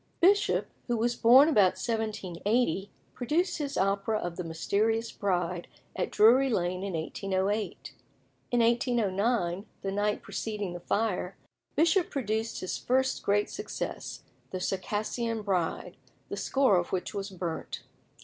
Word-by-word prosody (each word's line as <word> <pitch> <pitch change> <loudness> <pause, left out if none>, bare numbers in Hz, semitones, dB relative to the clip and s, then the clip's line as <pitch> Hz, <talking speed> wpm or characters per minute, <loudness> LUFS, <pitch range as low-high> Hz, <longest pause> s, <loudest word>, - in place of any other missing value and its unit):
Bishop, 400 +4 +4 0.2
who 240 -2 0
was 240 +2 +1
born 255 +5 +7
about 205 - +4
1780, 210 -2 -1 0.2
produced 315 +10 0
his 285 -2 -3
opera 195 +3 +1
of 175 -4 -4
"The 180 - -4
Mysterious 215 +8 0
Bride" 180 -3 -1 0.3
at 180 - -1
Drury 250 +6 +5
Lane 180 -4 0
in 200 -2 -3
1808. 195 +5 -2 0.6
In 245 -1 +2
1809, 225 -5 +1 0.2
the 195 - -1
night 205 +1 0
preceding 200 -1 -4
the 175 - -6
fire, 195 -1 -1 0.4
Bishop 340 +3 +3
produced 225 -3 -2
his 185 - -3
first 260 +1 +1
great 205 +1 +1
success, 420 - -5 0.3
"The 185 - -4
Circassian 215 +4 -2
Bride," 185 -5 -1 0.3
the - - -3
score 265 -8 +3
of 175 - -1
which 185 - -2
was 200 0 -4
burnt. 175 -4 -5
210 Hz, 130 wpm, -29 LUFS, 185-235 Hz, 0.6 s, born